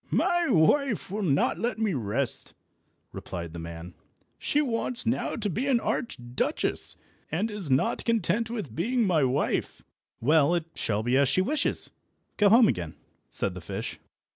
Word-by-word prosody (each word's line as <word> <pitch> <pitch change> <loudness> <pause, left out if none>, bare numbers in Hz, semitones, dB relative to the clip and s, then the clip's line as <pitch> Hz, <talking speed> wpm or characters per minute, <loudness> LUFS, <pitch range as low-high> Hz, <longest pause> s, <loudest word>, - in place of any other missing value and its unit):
"My 350 -2 +2
wife 230 - +3
will 210 +2 -2
not 145 -8 +1
let 240 0 -1
me 220 -3 0
rest," 120 +1 -1 0.6
replied 85 -3 -6
the 85 - -6
man; 85 +1 -8 0.5
"she 290 - +1
wants 245 -2 -1
now 235 +3 0
to 215 -3 -2
be 230 - -2
an 260 -4 +3
Archduchess, 125 - -2 0.3
and 200 +8 -1
is 205 -7 -3
not 130 +1 +1
content 230 0 +1
with 210 - -5
being 235 - +1
my 165 -6 +3
wife." 130 +2 0 0.4
"Well, 150 +5 +4
it 170 -2 -1
shall 110 0 -1
be 120 +2 +1
as 140 -1 +4
she 165 +7 +3
wishes. 285 +9 0 0.5
Go 205 -1 +5
home 230 +3 +7
again," - - -2 0.3
said - - -2
the - - -8
fish. - - -5
185 Hz, 160 wpm, -27 LUFS, -, 0.6 s, home